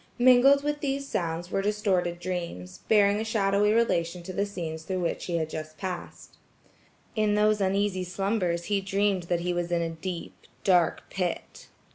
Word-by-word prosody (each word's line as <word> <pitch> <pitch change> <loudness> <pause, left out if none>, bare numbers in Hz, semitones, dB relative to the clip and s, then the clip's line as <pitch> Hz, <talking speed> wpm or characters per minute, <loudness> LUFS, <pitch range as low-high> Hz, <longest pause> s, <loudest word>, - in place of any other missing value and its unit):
Mingled 255 +3 +6
with 295 0 -1
these 275 -1 -2
sounds 175 -5 -3
were 195 - +1
distorted 195 -4 0
dreams–bearing 180 - 0
a - - -1
shadowy 210 -2 +2
relation 180 -6 +1
to 185 +2 -7
the 200 +2 0
scenes 165 -5 -5
through 185 +3 -3
which 170 - -2
he 170 -2 -1
had 160 -1 -1
just 155 0 -7
passed. 185 -2 -7 0.8
In 215 -1 +2
those 210 0 +3
uneasy 195 -1 +1
slumbers 180 -1 -1
he 200 +2 0
dreamed 195 -1 0
that 175 -1 +1
he 180 +1 -1
was 175 0 -2
in 170 -1 +1
a 165 - -2
deep, 170 +1 -6 0.3
dark 180 -4 +2
pit. 180 -3 -4
190 Hz, 165 wpm, -27 LUFS, 170-210 Hz, 0.8 s, Mingled